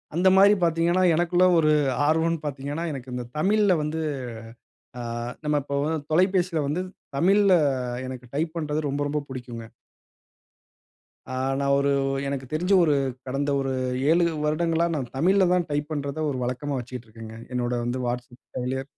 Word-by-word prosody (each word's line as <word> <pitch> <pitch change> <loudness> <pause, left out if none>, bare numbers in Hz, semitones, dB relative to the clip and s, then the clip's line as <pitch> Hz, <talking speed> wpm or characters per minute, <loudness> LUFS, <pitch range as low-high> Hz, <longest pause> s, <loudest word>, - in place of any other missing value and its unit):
அந்த 180 +3 +3
மாரி 200 +2 +7
பாத்தீங்கன்னா, 170 +2 +2
எனக்குள்ள 175 +2 +3
ஒரு 155 -2 +4 0.4
ஆர்வன்னு 165 +1 +2
பாத்தீங்கன்னா, 145 +3 -4
எனக்கு 130 -3 -7
இந்த 125 - -4
தமிழ்ல 200 +3 +3
வந்து 155 +2 -2 1.0
ஆ - - -4 0.4
நம்ம 150 0 +1
இப்ப 140 0 -4
வ - - 0 0.3
தொலைபேசில 180 -1 +2
வந்து, 155 +6 -1 0.4
தமிழ்ல 195 +5 +4 0.5
எனக்கு 130 -1 -7
டைப் 160 +3 -2
பண்றது 150 -2 -1
ரொம்ப 140 +1 -2
ரொம்ப 150 +1 -1
புடிக்குங்க. 120 -3 -7 1.7
ஆ - - -4 0.3
நான் 140 0 +2
ஒரு 140 0 +2 0.4
எனக்கு 140 -1 -3
தெரிஞ்சு 180 +5 +1
ஒரு 150 -3 +3 0.3
கடந்த 140 +2 -1
ஒரு 135 -1 -1 0.4
7 170 +1 +4 0.2
வருடங்களா 165 +2 +1
நான் 130 -5 -4
தமிழ்ல 190 +5 +4
தான் 180 -2 +1
டைப் 145 +1 -2
பண்றத 145 +1 -2
ஒரு 130 - -3
வழக்கமா 130 +3 -2
வச்சிக்கிட்ருக்கேங்க. 115 -2 -9 0.2
என்னோட 125 0 -1
வந்து 120 +2 -2
WhatsApp 120 0 -5 0.2
செயலிய 130 +1 -2
150 Hz, 145 wpm, -25 LUFS, 130-170 Hz, 1.7 s, மாரி